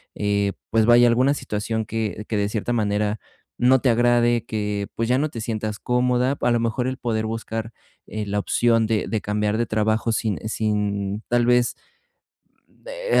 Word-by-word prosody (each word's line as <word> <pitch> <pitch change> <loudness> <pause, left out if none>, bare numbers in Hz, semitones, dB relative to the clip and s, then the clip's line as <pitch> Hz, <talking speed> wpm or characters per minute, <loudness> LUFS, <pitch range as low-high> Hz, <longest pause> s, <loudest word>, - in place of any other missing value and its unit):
eh, 100 -1 0 0.2
pues 110 0 +3
vaya, 120 +1 +6
alguna 130 +4 +3
situación 110 -3 -3
que 110 -1 -3
que 110 - 0
de 100 - +1
cierta 110 +2 -3
manera 105 -2 0 0.4
no 130 +2 +4
te 130 - +2
agrade, 120 0 +3
que 105 -2 -3
pues, 115 0 -1
ya 125 - +3
no 150 +3 +1
te 115 -6 -7
sientas 110 -2 -3
cómoda, 125 +2 +1
a 120 - +2
lo 120 - +2
mejor 115 +2 -1
el 130 - -3
poder 110 -3 -2
buscar, 115 0 -4 0.4
eh, 110 0 -4
la 100 0 -1
opción 115 +1 +2
de 110 -1 0
de 110 - 0
cambiar 105 +1 -1
de 120 - +1
trabajo 110 +1 0
sin 110 -3 -1
sin 105 -1 -1
tal 120 0 +2
vez 120 0 +3 0.9
de, - - -2
110 Hz, 175 wpm, -23 LUFS, 105-120 Hz, 0.9 s, vaya